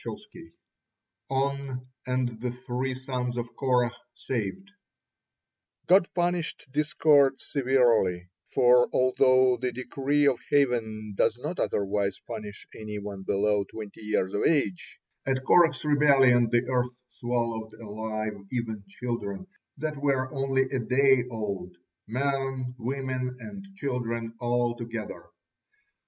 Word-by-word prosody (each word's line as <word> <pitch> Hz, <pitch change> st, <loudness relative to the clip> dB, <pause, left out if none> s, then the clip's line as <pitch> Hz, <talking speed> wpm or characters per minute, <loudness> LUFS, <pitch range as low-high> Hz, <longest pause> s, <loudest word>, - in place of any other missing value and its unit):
ON 135 Hz, -1 st, -2 dB, 0.2 s
AND 125 Hz, -3 st, -1 dB
THE 125 Hz, -, -1 dB
THREE 125 Hz, +1 st, -3 dB
SONS 125 Hz, -2 st, -3 dB
OF 120 Hz, 0 st, -5 dB
KORAH 125 Hz, -3 st, +2 dB, 0.2 s
SAVED 130 Hz, -, -4 dB, 1.1 s
God 185 Hz, -1 st, +5 dB
punished 175 Hz, -4 st, -1 dB
discord 150 Hz, -2 st, +4 dB
severely, 120 Hz, -, +2 dB, 0.2 s
for 125 Hz, 0 st, +5 dB
although 130 Hz, 0 st, +4 dB
the 125 Hz, +1 st, -2 dB
decree 135 Hz, +4 st, 0 dB
of 135 Hz, -4 st, +3 dB
Heaven 110 Hz, -6 st, +1 dB
does 110 Hz, -, +2 dB
not 150 Hz, +8 st, -5 dB
otherwise 100 Hz, -1 st, 0 dB
punish 105 Hz, -3 st, -7 dB
any 105 Hz, -1 st, -6 dB
one 100 Hz, -1 st, -6 dB
below 100 Hz, +1 st, +1 dB
twenty 105 Hz, +1 st, -9 dB
years 105 Hz, -3 st, -1 dB
of 100 Hz, -, 0 dB
age, 135 Hz, -, 0 dB, 0.3 s
at 130 Hz, -1 st, 0 dB
Korah's 170 Hz, -1 st, +4 dB
rebellion 135 Hz, -5 st, +5 dB
the 120 Hz, +1 st, +2 dB
earth 125 Hz, -1 st, 0 dB
swallowed 115 Hz, -2 st, -2 dB
alive 110 Hz, -1 st, -5 dB
even 110 Hz, -4 st, -3 dB
children 110 Hz, -, -4 dB, 0.3 s
that 155 Hz, +1 st, -3 dB
were 135 Hz, -2 st, +1 dB
only 135 Hz, -1 st, +1 dB
a 130 Hz, 0 st, -3 dB
day 130 Hz, +2 st, +3 dB
old 100 Hz, -6 st, -4 dB, 0.3 s
men, 135 Hz, +1 st, -1 dB
women, 130 Hz, 0 st, -3 dB
and 200 Hz, +3 st, -8 dB
children, 115 Hz, -7 st, -3 dB
all 120 Hz, 0 st, +1 dB
together. 110 Hz, -7 st, -6 dB
125 Hz, 115 wpm, -27 LUFS, 110-135 Hz, 1.1 s, God